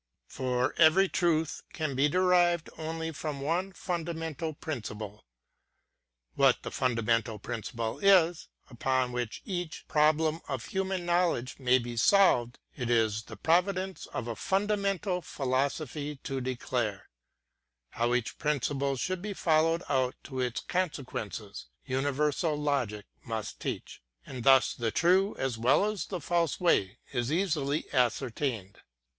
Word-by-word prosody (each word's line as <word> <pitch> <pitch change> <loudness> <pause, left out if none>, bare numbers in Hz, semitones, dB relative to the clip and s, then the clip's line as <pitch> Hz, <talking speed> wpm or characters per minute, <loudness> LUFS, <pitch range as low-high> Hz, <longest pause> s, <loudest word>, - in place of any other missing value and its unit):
For 125 - -1
every 170 +4 +6
truth 165 -4 0
can 155 -3 -2
be 135 +3 +3
derived 175 -1 +3
only 160 +1 -4
from 150 -2 -5
one 170 +7 -1
fundamental 165 -3 -3
principle. 105 - -6 1.1
What - - +3
the - - -5
fundamental 115 -3 0
principle 115 +1 -4
is, 180 -4 +4 0.2
upon 130 0 0
which 120 -2 -4
each 175 -5 -4
pro 150 0 +5
blem 155 +1 -1
of 130 -3 -4
human 190 -2 -2
knowledge 170 -9 +1
may 130 -1 +4
be 120 -1 -5
solved, 125 - +4 0.2
it 125 -3 -3
is 110 -2 +2
the - - -10
pro 170 +2 +4
vince 190 0 -5
of 120 - -5
a 115 - -3
fundamental 195 - 0
philosophy 140 +2 -2
to 135 -1 -3
declare; 120 -5 -2 0.4
— - - -55
how 120 +1 +1
each 125 -2 -2
principle 140 -1 0
should 180 +7 -2
be 205 +1 -4
followed 165 +1 +2
out 130 -2 +1
to 130 -2 -6
its 125 -2 -1
consequences, 125 - -4 0.2
uni 135 +1 0
versal 150 +2 0
logic 135 -8 -1 0.2
must 110 -2 -5
teach; - - -5
— - - -39
and 130 -3 -7
thus 135 0 +6
the 115 -2 -1
true 185 - +3
as 130 -4 -2
well 125 - +4
as 210 -2 -2
the 185 - -4
false 170 -2 0
way 100 - +2 0.2
is 120 +2 -1
easily 155 -4 0
ascertained. 120 -4 -1
145 Hz, 140 wpm, -29 LUFS, 120-170 Hz, 1.1 s, every